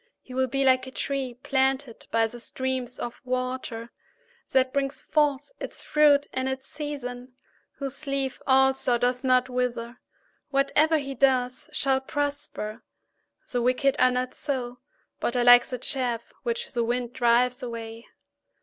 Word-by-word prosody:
3He 255 - -9
will 260 0 +1
be 275 +2 0
like 260 0 +4
a - - -7
tree 265 -2 -3
planted 265 -2 0
by 225 0 +3
the 240 +2 -6
streams 255 0 -3
of 240 - -6
water, 255 -2 -3 0.6
that 260 -1 +2
brings 280 +1 -1
forth 295 - +1
its - - -6
fruit 290 -1 +4
in 260 0 -1
its 265 0 -3
season, 270 -5 -6 0.4
whose 280 +2 -6
leaf 275 -1 -1
also 265 -2 +4
does 250 +1 0
not 255 0 +3
wither. 250 -1 -2 0.5
Whatever 295 +3 +3
he 275 -2 -4
does 255 -1 +1
shall 265 -1 +1
prosper. 285 -6 -3 0.7
4The 245 - -1
wicked 255 +3 +2
are 255 - +6
not 250 0 -1
so, 250 -4 -3 0.4
but 240 - -1
are 245 - +3
like 245 0 +8
the 250 - -4
chaff 245 -2 -2
which 475 0 -3
the 240 -2 0
wind 240 +1 -1
drives 245 0 +3
away. 230 -1 -7
255 Hz, 150 wpm, -26 LUFS, 245-275 Hz, 0.7 s, like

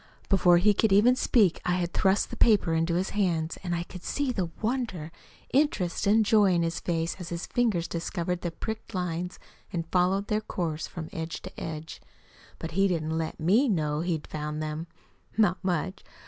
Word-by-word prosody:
Before 180 -3 +5
he 205 +4 +4
could 215 +1 +2
even 220 +6 +6
speak 210 -8 +3
I 180 - +1
had 175 -1 -1
thrust 190 +1 +2
the - - -4
paper 205 -7 +4
into 165 +1 +1
his 185 +2 0
hands, 170 -6 0
and 175 -2 -1
I 170 - -2
could 180 0 -10
see 285 -2 -1
the 185 -8 -2
wonder, 225 -9 -2 0.4
interest, 250 - +1
and 215 +2 +5
joy 205 -3 +5
in 170 - +2
his 165 0 -1
face 165 -1 -2
as 175 -2 -6
his 170 0 -4
fingers 210 -9 +1
discovered 175 +1 -3
the 175 - -2
pricked 220 +5 -6
lines 180 0 -3 0.3
and 165 -2 -2
followed 185 +2 +2
their 210 +1 0
course 165 -7 -3
from 165 -3 -7
edge 160 0 -5
to - - -7
edge. 160 0 -6 0.6
But 165 - -6
he 195 +4 +3
didn't 160 -3 -1
let 160 -1 -3
ME 210 - +3
know 155 -6 0
he'd 165 -2 -2
found 150 0 -4
them 155 +2 -4 0.5
not 200 -4 +2
much! 185 0 -1
180 Hz, 190 wpm, -28 LUFS, 165-200 Hz, 0.6 s, even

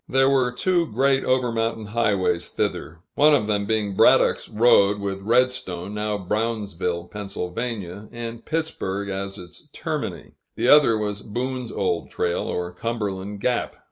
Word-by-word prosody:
There 135 +1 +4
were 130 -2 +2
two 170 +6 +1
great 135 +3 +2
over 130 -2 +1
mountain 115 -1 -1
highways 100 -5 0
thither, 80 +3 -3
one 150 +1 +5
of 120 - +1
them 100 -1 0
being 105 -2 0
Braddock's - - +4
Road, 105 -3 +4
with 100 -1 -3
Redstone 110 -5 0
(now 105 0 -1
Brownsville, 100 -4 -2
Pa.) 105 +3 -9 0.9
and 115 -1 -6
Pittsburg 100 -12 -3
as 95 +1 -4
its 90 -4 -12
termini; - - -4 0.2
the 125 - +1
other 145 -7 +6
was 105 -1 -2
Boone's 125 +3 -4
old 90 -3 -1
trail, 85 - -1
or 90 0 -3
Cumberland 100 -1 -4
Gap. 125 +1 0
105 Hz, 140 wpm, -23 LUFS, 100-125 Hz, 0.9 s, other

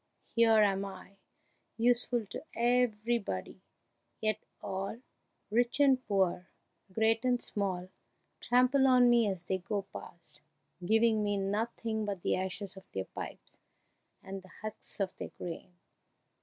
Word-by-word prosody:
Here 225 -2 +6
am 195 -1 +2
I, 195 0 -9 0.6
useful 240 0 +2
to - - -6
everybody, 235 - 0 0.6
yet 215 -2 0 0.2
all, 195 +4 -4 0.5
rich 240 +4 +2
and 270 -3 +5
poor, 185 -3 +1 0.4
great 225 +4 +2
and 250 -1 +2
small, 185 -5 -2 0.5
trample 255 +3 +4
on 250 -2 +6
me 235 -3 +4
as 185 -3 -3
they 190 +1 -1
go 200 +2 -2
past, 170 -1 -11 0.4
giving 220 +2 +3
me 205 -1 +1
nothing 220 +2 -1
but 200 -4 -4
the - - +2
ashes 190 +1 -4
of 190 - -14
their 95 0 -2
pipes - - -9 0.6
and 195 0 -6
the 190 - -17
husks 215 0 -6
of 195 -2 -1
their - - -5
grain!" 175 +1 -7
215 Hz, 130 wpm, -32 LUFS, 190-235 Hz, 0.6 s, Here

